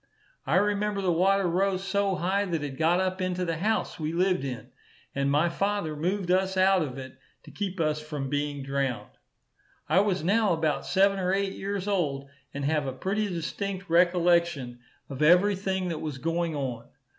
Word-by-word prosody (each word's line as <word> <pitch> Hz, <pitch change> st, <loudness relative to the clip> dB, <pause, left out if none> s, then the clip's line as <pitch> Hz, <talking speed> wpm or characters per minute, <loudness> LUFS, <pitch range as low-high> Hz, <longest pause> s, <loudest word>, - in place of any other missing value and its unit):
I 145 Hz, -, +2 dB
remember 205 Hz, +1 st, +1 dB
the 190 Hz, -2 st, +1 dB
water 190 Hz, +3 st, +3 dB
rose 190 Hz, +2 st, 0 dB
so 195 Hz, 0 st, 0 dB
high, 190 Hz, +3 st, 0 dB
that 165 Hz, -5 st, -2 dB
it 140 Hz, -2 st, -5 dB
got 165 Hz, +3 st, +3 dB
up 185 Hz, 0 st, -1 dB
into 185 Hz, 0 st, -1 dB
the 165 Hz, -1 st, -2 dB
house 215 Hz, +3 st, -1 dB
we 155 Hz, +1 st, -2 dB
lived 180 Hz, -3 st, +1 dB
in, 130 Hz, -3 st, -6 dB, 0.4 s
and 140 Hz, 0 st, 0 dB
my 150 Hz, +4 st, +3 dB
father 195 Hz, -2 st, -1 dB
moved 180 Hz, +4 st, -1 dB
us 190 Hz, +1 st, +1 dB
out 190 Hz, 0 st, +4 dB
of 135 Hz, -4 st, -4 dB
it, 130 Hz, -1 st, -9 dB, 0.2 s
to -, -, -13 dB
keep 195 Hz, -2 st, -4 dB
us 155 Hz, -1 st, 0 dB
from 150 Hz, -3 st, -5 dB
being 145 Hz, 0 st, -2 dB
drowned. 135 Hz, -6 st, -2 dB, 0.8 s
I -, -, +4 dB
was 195 Hz, -5 st, +1 dB
now 205 Hz, +2 st, +3 dB
about 160 Hz, -2 st, -1 dB
seven 195 Hz, +1 st, +3 dB
or 185 Hz, 0 st, 0 dB
eight 195 Hz, 0 st, 0 dB
years 200 Hz, 0 st, -4 dB
old, 145 Hz, -9 st, -1 dB, 0.2 s
and 140 Hz, 0 st, -4 dB
have 150 Hz, -1 st, 0 dB
a 130 Hz, -, -3 dB
pretty 200 Hz, +9 st, -1 dB
distinct 190 Hz, +2 st, -4 dB
recollection 170 Hz, -7 st, +2 dB, 0.3 s
of 135 Hz, 0 st, -7 dB
every 180 Hz, +6 st, +5 dB
thing 190 Hz, -1 st, -2 dB
that 160 Hz, -2 st, -4 dB
was 150 Hz, -4 st, -4 dB
going 165 Hz, +3 st, -1 dB
on. 130 Hz, -4 st, -4 dB
175 Hz, 185 wpm, -27 LUFS, 150-195 Hz, 0.8 s, every